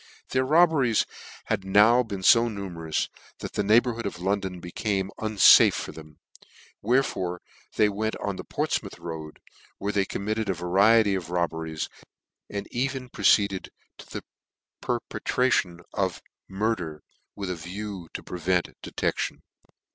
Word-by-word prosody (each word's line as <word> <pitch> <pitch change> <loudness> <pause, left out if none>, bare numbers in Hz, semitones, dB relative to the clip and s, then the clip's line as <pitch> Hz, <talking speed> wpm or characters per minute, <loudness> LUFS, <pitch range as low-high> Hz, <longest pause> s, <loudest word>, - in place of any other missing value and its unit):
Their 130 0 +1
robberies 150 -6 +4 0.4
had - - -1
now 105 +6 +5
been 100 -6 -5
fo 115 +4 +6
numerous, 85 -7 -3 0.3
that - - -7
the - - 0
neighbourhood 115 +2 +3
of 100 - -6
London 95 0 -1
became 95 +2 -2
unfafe 110 -3 +7
for - - -4
them; 75 -2 -13 0.6
wherefore 100 -7 0 0.4
they 105 - +4
went 110 +2 -2
on 100 -1 -3
the - - -6
Portfrnoutb. - - -2
road, 80 -2 -7 0.4
where 100 - -2
they 100 -1 +2
committed 105 +2 -2
a 95 - +1
variety 100 +5 +4
of 90 -4 -3
robbe 85 -1 0
ries, 80 -1 -4 0.6
and 100 0 -5
even 130 0 -2
proceeded 100 -5 +2 0.3
to - - -12
the - - -6 0.6
perpetration 95 -9 0
of 95 -3 -1 0.3
murder, 95 -6 -2 0.3
with 100 -2 -4
a - - -2
view 90 +1 -7
to - - -5
prevent 90 0 -1
detection. - - -2
100 Hz, 135 wpm, -26 LUFS, 90-110 Hz, 0.6 s, unfafe